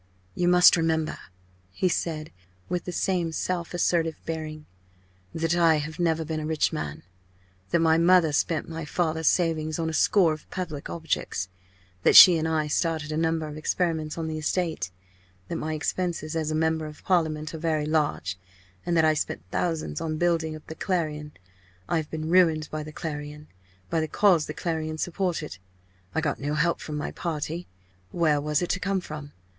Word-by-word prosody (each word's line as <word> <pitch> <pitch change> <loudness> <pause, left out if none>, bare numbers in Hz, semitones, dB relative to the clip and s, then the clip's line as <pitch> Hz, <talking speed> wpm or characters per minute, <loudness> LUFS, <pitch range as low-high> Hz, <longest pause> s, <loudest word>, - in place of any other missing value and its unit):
"You 175 - 0
must 180 0 +7
remember," 160 -1 0 0.5
he 140 - 0
said, 160 -3 -2 0.4
with 180 -1 -2
the 180 - -4
same 175 -2 0
self 170 +1 -2
assertive 165 -2 +1
bearing, 155 -1 -5 0.7
"that 165 0 0
I 165 -2 +5
have 155 +2 -4
never 165 -2 +1
been 160 0 -3
a 155 - -4
rich 155 -1 +1
man, 75 -1 -4 0.7
that 170 - +2
my 160 0 +4
mother 170 -2 +5
spent 155 +1 0
my 165 0 -5
father's 160 0 -1
savings 160 -3 +1
on 165 -1 -1
a - - -8
score 165 +1 +4
of 155 - -11
public 160 -6 -5
objects, 160 - -2 0.5
that - - +4
she 175 -3 +11
and 160 - -1
I 160 -1 +1
started 155 0 -1
a - - -2
number 160 0 0
of 150 0 -7
experiments 160 -1 -1
on 165 - -2
the 155 0 -3
estate, 160 - -1 0.6
that 165 - -2
my 155 0 -3
expenses 165 0 -2
as 160 -2 -1
a 155 - -1
member 160 0 0
of 150 - -12
Parliament 155 -4 0
are 160 - -5
very 155 -2 0
large, 150 - 0 0.5
and 170 -1 +2
that 160 - +5
I 155 - +4
spent 145 - -3
thousands 160 - -2
on 155 -1 -2
building 165 -2 +1
up 155 - -12
the - - -7
Clarion. 155 -5 -2 0.5
I 170 - +1
have 155 -2 -3
been 155 0 -4
ruined 165 -3 +3
by 155 - -3
the 155 0 -8
Clarion, 150 -1 -6 0.4
by 165 - +2
the 160 - -1
cause 175 -2 +3
the - - -6
Clarion 155 -2 -3
supported. 170 - -2 0.6
I 160 - +2
got 145 -3 -1
no 145 +2 -2
help 165 +3 +1
from 150 -1 -5
my 150 - -3
party 165 +1 -4 0.4
where 155 -4 +2
was 150 +3 0
it 175 - -3
to - - -1
come 195 +1 0
from? 150 -4 -8
160 Hz, 185 wpm, -26 LUFS, 155-170 Hz, 0.7 s, she